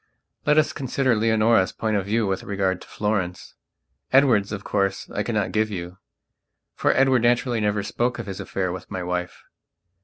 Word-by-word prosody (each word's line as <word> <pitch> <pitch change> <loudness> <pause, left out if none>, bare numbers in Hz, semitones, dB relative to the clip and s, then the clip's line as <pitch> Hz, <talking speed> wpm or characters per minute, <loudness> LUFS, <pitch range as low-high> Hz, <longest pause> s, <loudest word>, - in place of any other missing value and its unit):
Let 150 0 +4
us 155 - +3
consider 130 -2 0
Leonora's 110 -2 +3
point 110 -1 -2
of 100 -2 0
view 110 +2 +1
with 95 -1 -1
regard 95 -2 -1
to - - -13
Florence; 100 -4 -2 0.6
Edward's, 125 -7 +4
of 105 -2 -5
course, 100 -1 -1
I - - -2
cannot - - -1
give 110 0 +1
you, 90 -1 -6 0.7
for - - +2
Edward 130 -2 +4
naturally 120 0 +2
never 105 -1 0
spoke 120 +4 -1
of 120 - -5
his 95 -2 -6
affair 95 -2 -2
with 95 - -8
my 90 - -4
wife. 90 0 -4
105 Hz, 175 wpm, -24 LUFS, 95-120 Hz, 0.7 s, Let